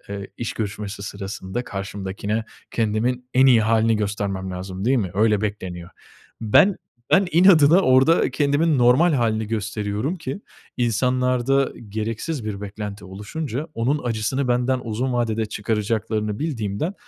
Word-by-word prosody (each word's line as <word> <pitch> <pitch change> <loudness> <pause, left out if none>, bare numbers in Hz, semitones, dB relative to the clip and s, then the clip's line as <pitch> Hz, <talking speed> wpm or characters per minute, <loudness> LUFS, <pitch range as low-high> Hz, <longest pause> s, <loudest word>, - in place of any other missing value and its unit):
eee, 100 -1 -6
iş 120 - -3
görüşmesi 105 -1 -5
sırasında 100 +2 -5
karşımdakine 100 +2 -4 0.3
kendimin 120 +3 -1
en 130 +1 +6
iyi 120 -4 +6
hâlini 115 0 +3
göstermem 100 -2 -2
lazım 95 +1 -6
değil 130 +3 +3
mi? 95 -5 -2
Öyle 105 0 +3
bekleniyor. 95 -5 -5 0.5
Ben 115 - +4 0.3
ben 195 0 +5
inadına 170 -1 +6
orada 135 +2 +4
kendimin 145 +1 +2
normal 130 +8 +5
hâlini 110 -4 0
gösteriyorum 105 - -2
ki 160 +2 -6 0.4
insanlarda 125 +3 +1 0.2
gereksiz 110 +6 -3
bir 105 -2 -4
beklenti 105 0 -7
oluşunca 125 - -5
onun 130 +6 0
acısını 120 +3 -1
benden 125 +1 +1
uzun 120 +3 -2
vadede 115 -2 0
çıkaracaklarını 105 0 -2
bildiğimden 140 - -2
110 Hz, 125 wpm, -22 LUFS, 105-130 Hz, 0.5 s, en